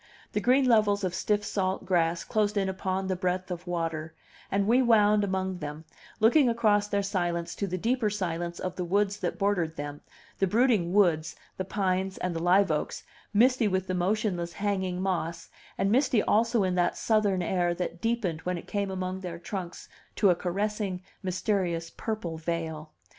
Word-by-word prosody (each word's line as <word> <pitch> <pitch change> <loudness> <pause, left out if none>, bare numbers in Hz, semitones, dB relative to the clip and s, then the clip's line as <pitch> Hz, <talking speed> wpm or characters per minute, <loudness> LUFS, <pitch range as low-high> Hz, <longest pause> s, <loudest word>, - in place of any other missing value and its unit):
The 210 - -1
green 260 +4 +4
levels 210 -4 +3
of 185 -2 -1
stiff 205 +2 0
salt 190 -1 -1
grass 170 -2 +1
closed 210 -1 0
in 195 -1 +1
upon 190 0 -2
the 190 0 -1
breadth 185 0 -2
of 180 +1 -6
water, 165 -2 -3 0.4
and 200 0 +2
we 240 +5 +4
wound 210 -3 +4
among 190 -1 -2
them, 150 +1 -6 0.3
looking 245 +5 +5
across 210 -3 +2
their 200 -1 0
silence 175 -3 -1
to 200 - -3
the 185 0 -2
deeper 230 +3 +1
silence 175 -4 -3
of 185 -1 -4
the 180 - -1
woods 200 +3 +1
that - - -2
bordered 185 -5 0
them, 145 0 -6 0.4
the 195 - +3
brooding 215 -4 +2
woods, 170 -5 +2 0.2
the 185 - -3
pines 190 -1 -1
and 180 -2 -2
the 165 - -2
liveoaks, 175 -3 +2 0.3
misty 240 +2 +4
with 190 -1 0
the 185 - -3
motionless 180 -2 0
hanging 190 -3 -1
moss, 175 -3 -2 0.3
and 195 +1 +1
misty 255 -2 +3
also 230 0 +2
in 185 -1 +1
that 175 -1 +1
Southern 205 -5 +2
air 175 -1 +1
that 175 -1 -4
deepened 220 -9 -1
when 180 +1 -2
it - - -8
came 200 -1 -2
among 185 0 -3
their 180 -3 -6
trunks 180 0 -6 0.3
to 200 -3 +4
a - - +2
caressing, 195 +1 -2 0.2
mysterious, 185 -3 -1
purple 180 -8 -4
veil. 160 -2 -3
190 Hz, 175 wpm, -28 LUFS, 175-210 Hz, 0.4 s, looking